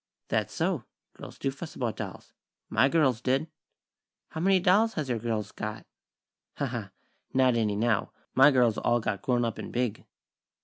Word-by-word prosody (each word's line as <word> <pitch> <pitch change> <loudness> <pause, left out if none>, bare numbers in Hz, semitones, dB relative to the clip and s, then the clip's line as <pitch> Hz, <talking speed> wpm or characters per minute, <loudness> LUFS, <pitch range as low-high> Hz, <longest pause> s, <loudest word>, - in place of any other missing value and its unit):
"That's - - 0
so. - - -1 0.3
Girls - - -11
do 135 - -1
fuss 155 +4 -9
about 120 -4 -2
dolls. - - -7 0.4
My 135 - +4
girls 135 -7 +2
did." 135 +5 +1 0.8
"How 160 - -5
many 190 +1 +4
dolls 205 +6 +3
has 150 -5 -2
your 120 -2 0
girls 110 -2 -2
got?" 105 0 -6 0.7
"Ha, - - 0
ha! - - -4 0.5
Not 130 -1 +5
any, 110 -3 +1
now. 115 0 +1 0.2
My 135 +3 +7
girls 125 -5 +3
all 120 0 +2
got 110 -4 -2
grown 120 0 +1
up 115 -2 -3
and - - -6
big." 120 -3 -2
125 Hz, 170 wpm, -28 LUFS, 115-140 Hz, 0.8 s, My